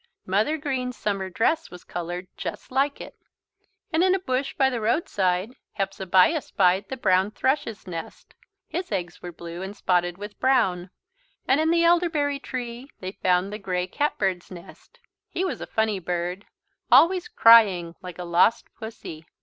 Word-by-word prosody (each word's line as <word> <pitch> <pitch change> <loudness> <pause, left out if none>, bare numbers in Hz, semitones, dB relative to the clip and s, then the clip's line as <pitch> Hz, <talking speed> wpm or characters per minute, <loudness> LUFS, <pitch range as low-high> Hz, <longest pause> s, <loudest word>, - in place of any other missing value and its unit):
Mother 210 +12 +1
Green's 260 -4 -3
summer 195 -2 -2
dress 310 - 0
was 180 -1 -12
coloured 175 +1 -5
just - - -6
like 275 +2 +1
it. - - -9 0.8
And 320 +2 +3
in 375 0 +4
a - - -1
bush 270 -5 -2
by 270 - +4
the 245 -3 -2
roadside, 210 - 0 0.2
Hepzebiah 195 - +2
spied 190 -3 +1
the 265 - -4
brown 190 -3 +2
thrush's 230 -2 -1
nest. 170 -3 -8 0.3
His 350 -1 -4
eggs 175 -4 -4
were 175 - -7
blue 170 +1 -8
and 195 +2 -7
spotted 175 -1 +1
with 205 +1 -9
brown. 185 -9 +2 0.6
And 270 +4 +3
in 320 - +2
the 335 0 +3
elderberry 330 -5 +2
tree 250 0 -6
they 185 0 -5
found 185 0 0
the 210 - -5
grey 180 -2 -2
cat 290 +11 -1
bird's 185 -3 -1
nest. 185 - -13 0.3
He 370 - -2
was 370 - -4
a - - -5
funny 220 -3 0
bird, 180 +2 -3 0.4
always 365 +3 +5
crying 215 - +6
like 180 -2 -9
a 180 - -5
lost 175 +7 +2
pussy. 175 -8 -9
205 Hz, 165 wpm, -25 LUFS, 180-275 Hz, 0.8 s, crying